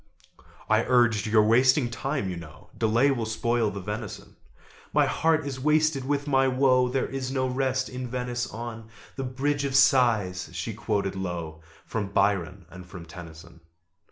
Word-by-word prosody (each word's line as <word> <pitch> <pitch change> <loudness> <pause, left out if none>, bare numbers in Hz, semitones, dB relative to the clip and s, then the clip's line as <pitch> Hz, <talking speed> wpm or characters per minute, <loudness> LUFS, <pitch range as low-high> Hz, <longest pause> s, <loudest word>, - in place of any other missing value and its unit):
I 110 +1 +3
urged 120 -4 +3
"You're 110 0 +4
wasting 125 +3 +4
time, 135 -1 -2
you 90 - -3
know: 80 -3 -12
Delay 115 +5 +2
will 120 -5 -2
spoil 115 0 0
the 100 0 -6
venison." 100 0 -7 0.6
"My - - +4
heart 160 -2 +1
is 135 -2 -5
wasted 150 -1 +2
with 145 0 0
my 135 -1 +3
woe! 130 -1 +3
There 130 +1 0
is 135 -1 -4
no 130 -1 0
rest 130 0 -1
in 125 0 -6
Venice, 125 0 -3
on 115 -1 -7 0.3
The 135 - -4
Bridge 140 +3 -1
of 135 -1 -2
Sighs!" 115 -9 +3
she 90 +6 -4
quoted 105 -2 -2
low 85 -4 -5 0.2
From 110 -3 -3
Byron 95 -3 0
and 90 -1 -10
from 90 -2 -10
Tennyson. 85 0 -12
120 Hz, 160 wpm, -26 LUFS, 100-130 Hz, 0.6 s, You're